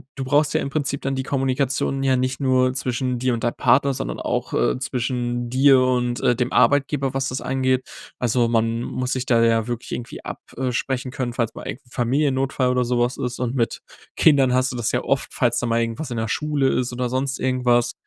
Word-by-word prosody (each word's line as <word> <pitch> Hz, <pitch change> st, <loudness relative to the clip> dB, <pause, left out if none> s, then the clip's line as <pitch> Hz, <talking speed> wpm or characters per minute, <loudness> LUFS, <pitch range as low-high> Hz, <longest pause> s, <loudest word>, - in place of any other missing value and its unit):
du 135 Hz, -, -4 dB
brauchst 145 Hz, +3 st, +2 dB
ja -, -, +1 dB
im -, -, -3 dB
Prinzip 140 Hz, -1 st, -2 dB
dann 135 Hz, 0 st, -2 dB
die 130 Hz, -, -2 dB
Kommunikation 135 Hz, 0 st, -1 dB
ja 135 Hz, -1 st, +3 dB
nicht 130 Hz, +1 st, -1 dB
nur 130 Hz, -2 st, +2 dB
zwischen 125 Hz, -1 st, -1 dB
dir 125 Hz, +1 st, 0 dB
und 115 Hz, -, -3 dB
deinem 120 Hz, -, 0 dB
Partner, 140 Hz, +1 st, +3 dB
sondern -, -, -4 dB
auch, -, -, -2 dB
äh, -, -, +1 dB
zwischen 120 Hz, -1 st, -2 dB
dir 135 Hz, +1 st, +5 dB
und, 125 Hz, -1 st, +1 dB
äh, 120 Hz, -, +3 dB
dem 125 Hz, +1 st, -2 dB
Arbeitgeber, 135 Hz, +2 st, +2 dB
was 135 Hz, 0 st, 0 dB
das 130 Hz, -, -4 dB
angeht. 130 Hz, 0 st, 0 dB, 0.4 s
Also, 120 Hz, -1 st, +2 dB
man 115 Hz, 0 st, 0 dB
muss 125 Hz, +1 st, -2 dB
sich 130 Hz, -1 st, -2 dB
da 115 Hz, -2 st, +3 dB
ja 115 Hz, -1 st, +3 dB
wirklich 120 Hz, -1 st, -5 dB
irgendwie 120 Hz, -, -6 dB
ab -, -, -6 dB, 0.2 s
äh, 130 Hz, 0 st, -1 dB
sprechen 130 Hz, +1 st, -2 dB
können, 125 Hz, -1 st, -3 dB
falls 115 Hz, -2 st, -2 dB
mal -, -, -8 dB
irgend 130 Hz, -, -6 dB
'n -, -, -22 dB
Familiennotfall 130 Hz, +1 st, +1 dB
oder 125 Hz, -1 st, +1 dB
so 120 Hz, 0 st, 0 dB
was 120 Hz, +1 st, 0 dB
ist. 125 Hz, 0 st, -4 dB
Und 125 Hz, 0 st, -2 dB
mit 115 Hz, -3 st, -1 dB, 0.3 s
Kindern 135 Hz, -5 st, +4 dB
hast 130 Hz, +1 st, +2 dB
du -, -, -6 dB
das 120 Hz, -1 st, -1 dB
ja -, -, 0 dB
oft, 135 Hz, -, -1 dB
falls 120 Hz, -3 st, +1 dB
da -, -, -1 dB
mal 115 Hz, 0 st, +1 dB
irgendwas 115 Hz, +5 st, -3 dB
in 120 Hz, -, -3 dB
der 110 Hz, 0 st, -1 dB
Schule 150 Hz, -1 st, 0 dB
ist 125 Hz, -1 st, -1 dB
oder 125 Hz, 0 st, -2 dB
sonst 130 Hz, +2 st, -2 dB
irgendwas. 125 Hz, -2 st, +2 dB
130 Hz, 225 wpm, -22 LUFS, 120-135 Hz, 0.4 s, dir